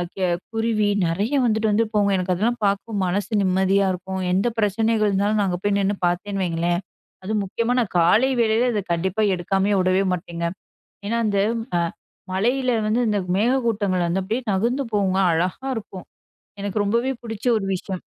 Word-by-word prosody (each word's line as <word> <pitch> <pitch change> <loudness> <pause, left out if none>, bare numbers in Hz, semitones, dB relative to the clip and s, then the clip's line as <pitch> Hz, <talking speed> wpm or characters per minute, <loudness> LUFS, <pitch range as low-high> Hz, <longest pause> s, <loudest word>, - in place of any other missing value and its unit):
க - - -27 0.4
குருவி 225 -2 +1 0.2
நிறைய 200 +11 -1
வந்துட்டு 220 -1 +1
வந்து 225 +2 +2
போகும். 205 -1 +2
எனக்கு 185 0 0
அதுலாம் 230 +7 0
பார்க்கும் 200 +2 -1
மனசு 195 +5 -2
நிம்மதியா 190 +1 +2
இருக்கும். 190 +1 -5
எந்த 195 +5 +2
பிரச்சனைகள் 215 +1 +2
இருந்தாலும் 200 +2 +1
நான் 200 - +2
அங்க 180 -1 -2
போய் 205 -1 +1
நின்னு 200 +1 +1
பார்த்தேன்னு 195 +3 -2
வையுங்களேன்! 175 +1 0 0.4
அதுவும் 210 +2 -1
முக்கியமா 230 +5 -1
நான் 230 -5 -1
காலை 210 +10 +4
வேளையில 230 +2 +2
இத 210 - 0
கண்டிப்பாக 190 +4 +1
எடுக்காமயே 195 +3 0
விடவே 185 +1 +2
மாட்டேங்க. 170 -1 -4 0.6
ஏன்னா 230 +2 0
அந்த, 200 -2 +1 0.4
அ - - +2 0.5
மலையில 250 +7 +1 0.2
வந்து 225 +3 +1
இந்த 205 -1 +1 0.2
மேகக்கூட்டங்கள் 215 -6 +1
வந்து 180 +3 0
அப்டியே 225 +7 -2
நகுந்து 240 +8 0
போகுங்க. 195 -2 +1
அழகா 180 +11 -1
இருக்கும். 200 -4 -8 0.6
எனக்கு 205 +1 -1
ரொம்பவே 235 +6 +1
பிடிச்ச 225 -2 -7
ஒரு 195 - -4
விஷயம். 185 0 -5
200 Hz, 160 wpm, -22 LUFS, 185-225 Hz, 0.6 s, காலை